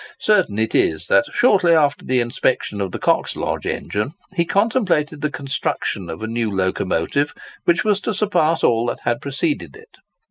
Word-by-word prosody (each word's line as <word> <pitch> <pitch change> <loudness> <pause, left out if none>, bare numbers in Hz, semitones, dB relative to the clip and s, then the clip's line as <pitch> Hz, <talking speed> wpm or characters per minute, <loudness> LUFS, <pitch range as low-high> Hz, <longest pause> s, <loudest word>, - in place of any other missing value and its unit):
Certain 190 - +2
it 110 0 0
is, 80 -1 +2
that, 295 - +3
shortly 190 -8 +4
after 145 -3 +2
the 130 0 +1
inspection 120 -3 -1
of 95 -2 -2
the - - -4
Coxlodge - - -1
engine, 105 +8 -3 0.2
he 170 -3 +1
contemplated 185 - +1
the 150 - 0
construction 135 - -3
of 80 +5 -6
a - - -2
new 115 0 -1
locomotive, 95 - -1 0.3
which 170 -1 +3
was 210 -2 +1
to - - -2
surpass 175 -6 +1
all 115 0 +3
that - - -3
had 120 0 0
preceded 140 - -2
it. - - -17
140 Hz, 170 wpm, -20 LUFS, 110-175 Hz, 0.3 s, shortly